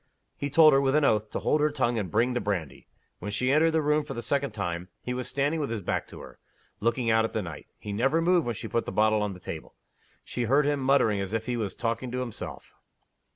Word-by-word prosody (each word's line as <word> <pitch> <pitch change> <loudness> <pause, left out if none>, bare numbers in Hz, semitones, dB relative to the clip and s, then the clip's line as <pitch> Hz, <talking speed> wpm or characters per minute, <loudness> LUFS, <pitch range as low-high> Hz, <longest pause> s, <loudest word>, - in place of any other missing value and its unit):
He 145 - -3
told 155 +1 +7
her, 135 - +5
with 135 0 +2
an 150 -1 +4
oath, 110 -3 +2
to - - -4
hold 150 - +1
her 150 - +3
tongue 120 -5 0
and 95 -4 -3
bring 120 +4 +2
the 120 - -1
brandy. 90 -8 -3 0.3
When 105 - -5
she 125 +5 0
entered 155 +3 +4
the 160 -1 +1
room 150 +1 +2
for 140 -2 -7
the 120 - -4
second 140 +3 0
time, 90 -3 -4
he 125 - -3
was 125 0 -3
standing 145 +4 0
with 145 - -2
his 115 -2 -3
back - - -2
to - - -11
her, - - -13 0.4
looking 115 +1 +1
out 110 0 +4
at 115 - -3
the 110 - 0
night. 85 -4 -8
He 105 - -6
never 135 +9 +2
moved 170 -3 +3
when 120 - -1
she 110 - -6
put 115 +2 -1
the - - -2
bottle 110 +2 +3
on 105 -1 -1
the 90 - -11
table. 80 -3 -8 0.5
She 125 - -3
heard 140 +5 +3
him 145 -1 +1
muttering 130 -7 +3
as 100 +2 -4
if 110 0 -1
he 125 - -1
was 110 -5 -3
talking 115 +2 -2
to 125 - -1
himself. 125 -4 -7
120 Hz, 260 wpm, -27 LUFS, 105-140 Hz, 0.5 s, told